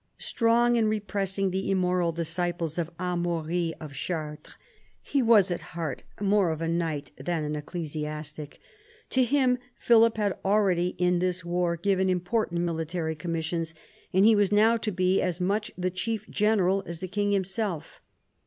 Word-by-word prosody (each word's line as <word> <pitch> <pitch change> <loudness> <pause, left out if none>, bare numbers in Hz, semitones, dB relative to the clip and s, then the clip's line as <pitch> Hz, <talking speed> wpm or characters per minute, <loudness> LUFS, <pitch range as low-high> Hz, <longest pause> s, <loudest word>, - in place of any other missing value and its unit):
Strong 235 +1 +2
in 225 -2 +3
repressing 195 -2 -1
the 190 +1 -2
immoral 180 -2 +2
disciples 170 0 -2
of 165 -1 -1
Amaury 175 -1 -1
of 155 -3 -8
Chartres, 150 0 -5 0.4
he 280 - 0
was 215 -6 +5
at 175 - -2 0.2
heart 155 -6 -3 0.2
more 200 -2 +3
of 160 -1 -2
a 165 - -2
knight 165 -4 -2
than 155 +4 -2
an 150 0 -2
ecclesiastic. 150 -1 -6 0.5
To 260 - +3
him 250 -1 +2 0.2
Philip 230 -1 +4
had 205 -3 0
already 190 -3 +2
in 180 -1 +2
this 180 -1 -1
war 175 0 0
given 190 +1 +1
important 180 0 0
military 165 -1 -2
commissions, 165 +1 -3 0.4
and 190 +2 +4
he 225 0 +7
was 205 -1 +2
now 220 +3 +5
to 225 -2 -2
be 185 0 +2
as 175 -1 -1
much 205 +4 0
the 185 0 -1
chief 215 +4 -3
general 195 -3 +2
as 170 0 -5
the 185 - -4
king 205 +2 -1
himself. 195 -3 -2
180 Hz, 155 wpm, -27 LUFS, 165-205 Hz, 0.5 s, he